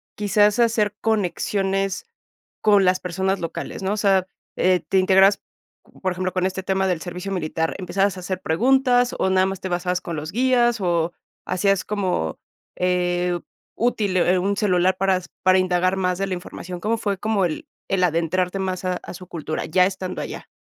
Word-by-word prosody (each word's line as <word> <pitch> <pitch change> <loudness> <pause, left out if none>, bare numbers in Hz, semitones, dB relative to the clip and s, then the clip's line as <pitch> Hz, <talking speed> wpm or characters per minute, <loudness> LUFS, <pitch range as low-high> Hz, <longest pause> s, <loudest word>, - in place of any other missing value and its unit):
quizás 205 +1 +3
hacer 220 -3 +2
conexiones 195 - 0 0.6
con 205 -2 +5
las 185 0 +3
personas 190 +2 -1
locales?, 170 +3 -5
¿no? 190 - 0
O - - -3
sea, 195 -3 +3 0.3
eh, 185 0 +3
te 190 - +4
integrabas, 190 +2 +5 0.6
por 185 - +1
ejemplo, 185 0 -2
con 185 0 0
este 190 0 -2
tema 190 0 0
del 175 -3 -1
servicio 180 +2 -6
militar, 160 -2 -2
¿empezabas 190 +2 0
a - - -7
hacer 185 +1 -4
preguntas 245 +7 +3
o 190 - +2
nada 185 0 +3
más 195 -1 -4
te 190 - -4
basabas 180 0 -1
con 170 - -5
los 155 +3 -5
guías 240 -1 +3
o 170 -1 0 0.3
hacías 195 +1 +1
como, 185 - -2 0.4
eh, 180 -1 +1 0.4
útil, 215 -5 0
eh, 180 +1 +3
un 200 +2 0
celular 185 -3 +2
para 195 -1 +2
s 180 - -8 0.2
para 185 0 +5
indagar 185 +1 +1
más 180 -1 0
de 195 - 0
la 190 - -2
información? 180 0 -8
¿Cómo 225 +2 0
fue 200 -3 -2
como 210 -2 0
el 160 -3 -4 0.2
el 190 -1 +1
adentrarte 180 +3 0
más 185 -1 -3
a 185 - +1
a - - -8
su 180 0 -10
cultura? 160 -2 -4
Ya 180 +3 +4
estando 185 -1 -4
allá. - - -7
185 Hz, 185 wpm, -22 LUFS, 180-200 Hz, 0.6 s, con